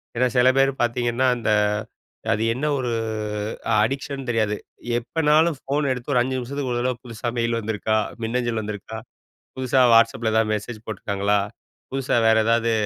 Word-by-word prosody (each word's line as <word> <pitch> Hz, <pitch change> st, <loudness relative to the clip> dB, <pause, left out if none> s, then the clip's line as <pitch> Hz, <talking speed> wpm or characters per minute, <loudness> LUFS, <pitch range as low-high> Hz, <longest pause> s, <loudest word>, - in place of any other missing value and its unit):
ஏன்னா 125 Hz, +2 st, +3 dB
சில 125 Hz, +1 st, +6 dB
பேர் 135 Hz, 0 st, +4 dB
பாத்தீங்கன்னா 120 Hz, +1 st, +1 dB
அந்த 115 Hz, -, -2 dB, 0.8 s
அது 110 Hz, -, -1 dB
என்ன 135 Hz, +5 st, -3 dB
ஒரு 125 Hz, -2 st, -2 dB, 0.9 s
அடிக்ஷன் 135 Hz, +2 st, -3 dB
தெரியாது. 110 Hz, -3 st, +1 dB, 0.4 s
எப்பனாலும் 155 Hz, +4 st, +2 dB
ஃபோன 140 Hz, 0 st, -1 dB
எடுத்து 125 Hz, +3 st, -6 dB
ஒரு 125 Hz, -, +4 dB
5 130 Hz, +1 st, -1 dB
நிமிஷத்துக்கு 130 Hz, +1 st, -3 dB
ஒரு 120 Hz, -, -1 dB
தடவ, 125 Hz, 0 st, 0 dB
புதுசா 115 Hz, 0 st, -6 dB
மெயில் 115 Hz, 0 st, +1 dB
வந்துருக்கா? 110 Hz, 0 st, -1 dB, 0.3 s
மின்னஞ்சல் 120 Hz, 0 st, -1 dB
வந்திருக்கா? 105 Hz, +1 st, -6 dB, 0.6 s
புதுசா 130 Hz, 0 st, +1 dB
WhatsAppல 115 Hz, 0 st, +3 dB
ஏதாவது 110 Hz, -1 st, +2 dB
மெசேஜ் 110 Hz, +1 st, -6 dB
போட்டிருக்காங்களா? 100 Hz, -1 st, 0 dB, 0.5 s
புதுசா 135 Hz, -2 st, 0 dB
வேற 110 Hz, 0 st, +5 dB
ஏதாவது 115 Hz, 0 st, +2 dB
120 Hz, 145 wpm, -23 LUFS, 110-130 Hz, 0.9 s, சில